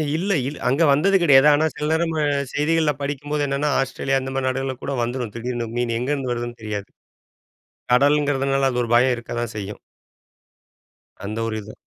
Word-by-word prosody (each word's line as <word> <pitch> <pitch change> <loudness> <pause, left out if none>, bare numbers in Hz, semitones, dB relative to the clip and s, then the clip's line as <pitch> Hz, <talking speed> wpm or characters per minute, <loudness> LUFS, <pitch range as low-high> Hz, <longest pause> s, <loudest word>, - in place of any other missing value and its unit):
இல்ல, 185 +5 -1 0.2
இல் 145 - -6
அங்க 135 +6 +1
வந்தது 180 +8 +3
கெடையாது. 145 -3 +6
ஆனா, 150 +2 +2
சில 150 - -4
நேரம் 165 +1 +1
ம - - -2 0.4
செய்திகள்ல 155 +1 +2
படிக்கும்போது 145 +1 -2
என்னென்னா, 140 +2 0
ஆஸ்ட்ரேலியா 135 0 0
அந்த 130 - -5
மாதிரி 135 -1 -1
நாடுகள் 130 0 -3
கூட 140 - -3
வந்துரும் 120 -2 -4
திடீர்னு 120 0 -3
மீனு. 120 -1 0
எங்க 130 +4 -2
இருந்து 135 -3 -3
வருதுன்னு 120 0 -5
தெரியாது. 105 -2 -5 1.1
கடல்ங்கிறதுனால 135 0 +2
அது 125 - -1
ஒரு 115 - -5
பயம் 125 +1 +4
இருக்கத்தான் 120 0 -5
செய்யும். 105 0 -6 1.5
அந்த 110 +2 -4
ஒரு 110 - -3
இதும். 105 +1 -12
135 Hz, 165 wpm, -22 LUFS, 120-145 Hz, 1.5 s, கெடையாது